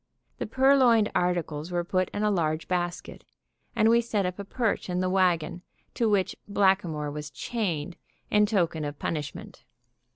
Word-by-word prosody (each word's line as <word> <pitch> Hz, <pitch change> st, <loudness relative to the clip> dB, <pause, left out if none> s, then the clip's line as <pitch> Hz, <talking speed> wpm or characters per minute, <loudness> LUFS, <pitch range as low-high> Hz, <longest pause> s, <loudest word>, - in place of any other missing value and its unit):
The -, -, -3 dB
purloined 260 Hz, -5 st, +4 dB
articles 175 Hz, -2 st, -1 dB
were 175 Hz, 0 st, 0 dB
put 185 Hz, +1 st, 0 dB
in 205 Hz, -, -3 dB
a 210 Hz, -, +3 dB
large 160 Hz, -4 st, -1 dB
basket, 175 Hz, -1 st, -3 dB, 0.5 s
and 220 Hz, -1 st, +4 dB
we 235 Hz, +1 st, +5 dB
set 215 Hz, -4 st, -1 dB
up 180 Hz, +2 st, -4 dB
a -, -, -3 dB
perch 220 Hz, -1 st, -2 dB
in 180 Hz, 0 st, -1 dB
the 185 Hz, 0 st, 0 dB
wagon, 175 Hz, -2 st, +1 dB, 0.3 s
to 230 Hz, -3 st, +1 dB
which 200 Hz, -3 st, +1 dB
Blackamoor 185 Hz, -7 st, +1 dB
was 150 Hz, 0 st, -6 dB
chained 180 Hz, -6 st, -3 dB, 0.3 s
in 210 Hz, 0 st, +4 dB
token 170 Hz, -7 st, 0 dB
of 145 Hz, -1 st, -5 dB
punishment. 150 Hz, -3 st, -5 dB
185 Hz, 160 wpm, -27 LUFS, 165-210 Hz, 0.5 s, we